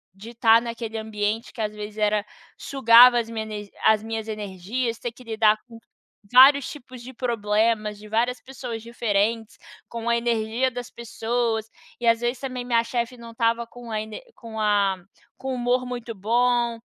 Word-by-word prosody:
de 220 +5 -11
tá 230 -1 +6
naquele 230 -1 -5
ambiente 220 +1 -3
que 230 - -6
às 210 -1 -2
vezes 210 0 -7
era 210 -1 +1 0.3
sugava 245 -2 +6
as 230 -1 -4
minha 215 -2 -5 0.2
as 215 -1 +5
minhas 225 0 -4
energias, 215 +3 -3
ter 240 - -4
que 250 +2 -16
lidar 220 -2 +3
com 230 -2 -12 0.6
vários 270 +2 +8
tipos 255 -3 -11
de 260 +2 -10
problemas, 215 -3 0
de 215 - -12
várias 240 +3 0
pessoas 250 -4 -7
diferentes, 225 -1 -1 0.3
com 235 0 -4
a 235 - +3
energia 235 +2 0
das 245 0 -6
pessoas, 230 -1 -2 0.3
e 240 - -2
às 230 0 +4
vezes 240 +1 -1
também 255 -2 -5
minha 235 -2 +2
chefe 235 +1 -3
não 235 -1 -11
estava 230 0 0
com 240 0 -11
a 215 -1 -1
ener 220 - -8
com 225 -2 -8
a 205 -2 +2 0.4
com 265 - -5
o - - -2
humor 250 +1 0
muito 240 -2 -6
bom, 235 +3 +1
230 Hz, 175 wpm, -24 LUFS, 220-245 Hz, 0.6 s, vários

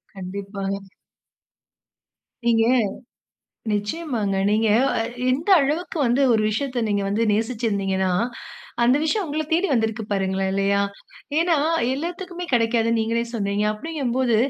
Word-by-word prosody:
கண்டிப்பாங்க. 195 +1 -4 1.7
நீங்க 225 -1 +4 1.1
நிச்சயமாங்க. 210 -1 -1
நீங்க 215 +1 +2 0.3
அ - - 0 0.3
எந்த 290 +8 -1
அளவுக்கு 315 +6 -2
வந்து 245 +3 +2
ஒரு 220 -2 +3
விஷயத்த 255 +2 -2
நீங்க 205 -1 0
வந்து 205 +3 0
நேசிச்சு 225 +3 -1
இருந்தீங்கன்னா, 190 -2 0 0.7
அந்த 245 +3 +5
விஷயம் 380 +6 +1
உங்கள 310 +1 -2
தேடி 345 +4 +3
வந்திருக்கு 220 -2 0
பாருங்களேன், 190 0 0
இல்லயா! 195 +1 +2 0.6
ஏன்னா, 335 -1 +3 0.4
எல்லாத்துக்குமே 355 +4 -5
கிடைக்காதுன்னு 230 -1 +2
நீங்களே 230 +1 0
சொன்னீங்க. 200 -1 0
அப்பிடிங்கும்போது 255 -2 -1
225 Hz, 110 wpm, -23 LUFS, 200-275 Hz, 1.7 s, அந்த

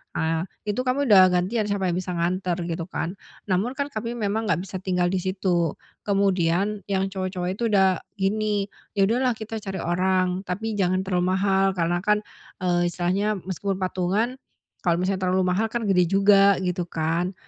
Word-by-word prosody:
Ah, 160 +3 0 0.2
Itu 215 +5 -2
kami 275 +3 +1
udah 185 -2 +9
gantian 190 +5 0
siapa 195 -3 0
yang 175 - -1
bisa 180 -1 -4
nganter 180 +1 0 0.2
gitu 165 +1 -4
kan, 175 -1 -3 0.4
namun 220 +9 0
kan 280 +1 -3
kami 230 +2 -4
memang 220 0 -1
nggak 180 -2 +1
bisa 185 -1 -6
tinggal 180 -1 0
di 190 - 0
situ. 180 -3 0 0.3
Kemudian 195 0 +1
yang 195 -1 0
cowok-cowok 185 -1 -3
itu 230 +4 -1
udah 190 -4 +3 0.2
gini, 205 +1 0 0.3
"Ya 195 - +3
udahlah 245 +3 +2
kita 220 0 -6
cari 195 -3 -5
orang, 185 +1 +1
tapi 220 +5 -3
jangan 185 0 +1
terlalu 185 0 0
mahal," 195 0 +2
karena 175 0 0
kan, 210 +2 +1 0.4
eee, 175 -1 +2
istilahnya 190 +5 0
meskipun 190 +2 -3
patungan, 190 +7 -1 0.5
kalau 170 0 +2
misalnya 190 0 0
terlalu 185 0 +2
mahal, 200 +5 +1
kan 235 +1 -3
gede 180 -2 +4
juga, 195 +1 +5
gitu 180 -1 -1
kan. 170 +3 -1
190 Hz, 170 wpm, -24 LUFS, 180-205 Hz, 0.5 s, udah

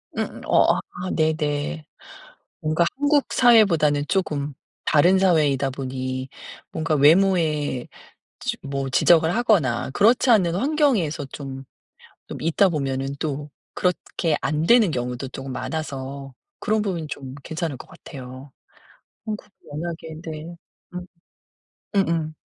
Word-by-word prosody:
음 - - -4
어 - - +4 0.2
아 185 +1 -3
네네. 155 -1 -1 0.8
뭔가 155 +2 +1
한국 290 0 +2
사회보다는 170 - +5
쪼금 150 -7 -1 0.3
다른 175 +5 +5
사회이다 150 -8 +3
보니 130 0 -4 0.4
뭔가 160 -1 0
외모에 155 -4 +3 0.5
지 - - -2
뭐 135 -1 -3
지적을 165 +3 +4
하거나 175 - +2
그렇지 230 - +4
않은 185 -7 +4
환경에서 240 - +1
좀 135 -1 -8 0.6
좀 - - -7
있다 165 +6 +3
보면은 135 -4 -2
또 145 0 -4 0.2
그렇게 175 -3 0
안되는 175 +7 +3
경우도 125 +1 -3
쪼금 135 +1 -7
많아서 135 -1 -5 0.3
그런 215 +1 +1
부분이 180 -7 -3
좀 135 -2 -7
괜찮을 160 -2 -4
것 - - -12
같아요. 130 -1 -11 0.7
한국은 210 -1 -6 0.2
워낙에 160 +1 -6
네. 160 +1 -7 0.4
음. 180 0 -5 0.9
음음. 165 -5 +1
155 Hz, 245 characters per minute, -23 LUFS, 140-180 Hz, 0.9 s, 사회보다는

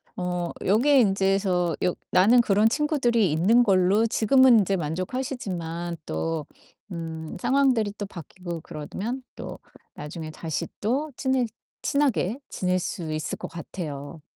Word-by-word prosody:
어 180 -1 -2 0.2
여기에 255 +7 +5
인제서 195 -4 +2
여 180 - +2 0.2
나는 210 +7 +6
그런 215 -1 +3
친구들이 240 - +2
있는 220 +10 +4
걸로 195 +2 +3
지금은 245 +2 +5
인제 195 0 +1
만족하시지만 175 - -3
또 150 - -2 0.4
음 160 -3 -6
상황들이 260 -6 +2
또 205 - -3
바뀌고 175 -2 -8
그러면 215 - -5
또 - - -7 0.4
나중에 155 +1 -7
다시 160 -1 -4
또 270 +8 -1
친해 260 -2 +1 0.4
친하게 255 - +1
지낼 185 0 0
수 170 -2 -4
있을 155 0 -3
것 - - -6
같아요. 155 -3 -7
190 Hz, 270 characters per minute, -25 LUFS, 170-240 Hz, 0.4 s, 나는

